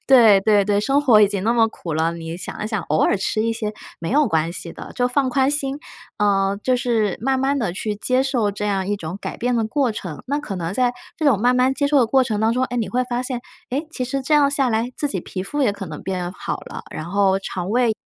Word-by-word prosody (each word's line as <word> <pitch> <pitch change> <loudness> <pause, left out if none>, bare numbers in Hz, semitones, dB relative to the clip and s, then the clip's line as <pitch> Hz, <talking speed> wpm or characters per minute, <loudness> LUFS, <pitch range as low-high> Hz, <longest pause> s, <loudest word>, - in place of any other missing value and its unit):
对， 225 -7 +7
对 205 -2 +4
对， 205 0 +1
生 275 +6 +2
活 230 -6 +6
已 210 - +7
经 200 -1 -3
那 230 +3 +2
么 230 -2 +4
苦 170 -6 -7
了， 160 +2 +1
你 165 0 -6
想 180 +3 -6
一 - - -2
想， 215 -4 -1
偶 155 +1 0
尔 - - +3
吃 215 +3 -1
一 230 0 0
些 215 -2 -3 0.3
没 165 - -4
有 295 +2 +4
关 165 -1 0
系 170 -2 -7
的， - - -10
就 250 0 +1
放 265 +1 +1
宽 265 +1 +2
心。 285 -1 -1 0.4
呃， 200 -1 +2
就 255 -1 +2
是 225 -5 0
慢 265 +2 +1
慢 275 +1 +1
地 205 -8 -1
去 210 +2 -3
接 255 +5 +1
受 245 -6 0
这 210 +1 -4
样 195 -2 0
一 205 - 0
种 170 +1 -6
改 - - -5
变 245 0 0
的 225 - +1
过 255 +2 +1
程， 175 -8 -6
那 285 - 0
可 220 -9 -5
能 170 0 -3
在 245 +2 +1 0.2
这 315 - -1
种 230 -8 +4
慢 250 +1 +4
慢 260 +1 +3
接 285 0 0
受 285 -1 +4
的 240 - +4
过 265 +3 +4
程 220 -4 -1
当 220 +1 +3
中， 255 +2 0
哎， 245 - -4
你 230 -3 -1
会 250 +1 0
发 245 +1 0
现， 250 -2 -3 0.3
哎， 275 +4 -1
其 255 - -3
实 270 +2 -2
这 300 - -2
样 285 -1 +5
下 275 -2 +1
来 225 +1 0
自 290 - -1
己 190 -7 -2
皮 185 +2 -5
肤 290 +9 -2
也 210 -6 +3
可 200 -1 -7
能 155 -1 -7
变 180 -2 -3
好 - - -4
了， - - -8
然 155 - -5
后 195 +1 +2
肠 185 0 -4
胃， 240 -1 +3
225 Hz, 290 characters per minute, -21 LUFS, 195-260 Hz, 0.4 s, 对